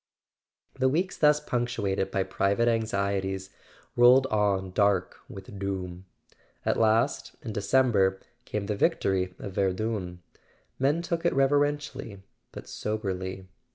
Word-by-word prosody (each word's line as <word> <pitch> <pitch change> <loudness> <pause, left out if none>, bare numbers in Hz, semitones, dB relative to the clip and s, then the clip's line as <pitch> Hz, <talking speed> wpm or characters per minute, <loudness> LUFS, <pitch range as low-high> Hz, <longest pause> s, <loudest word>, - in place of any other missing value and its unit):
The 130 0 +3
weeks 175 +7 0
thus 150 -1 +4
punctuated 120 -8 -1
by 95 - 0
private 100 +4 +1
anxieties 100 -4 -1 0.4
rolled 125 +2 +6
on 100 -3 +1
dark 100 -2 +1
with 100 -3 -10
doom. 95 -2 -4 0.6
At - - +1
last, 115 +5 +1
in 115 -5 -5
December, 100 -3 +2 0.2
came 105 -1 -4
the 105 - -2
victory 95 -2 +1
of 100 - -7
Verdun. 95 -2 -2 0.6
Men 145 +6 +1
took 170 -1 -2
it 170 - +2
reverently 135 -6 0 0.3
but - - -10
soberly. 95 -3 -4
100 Hz, 120 wpm, -27 LUFS, 95-125 Hz, 0.6 s, rolled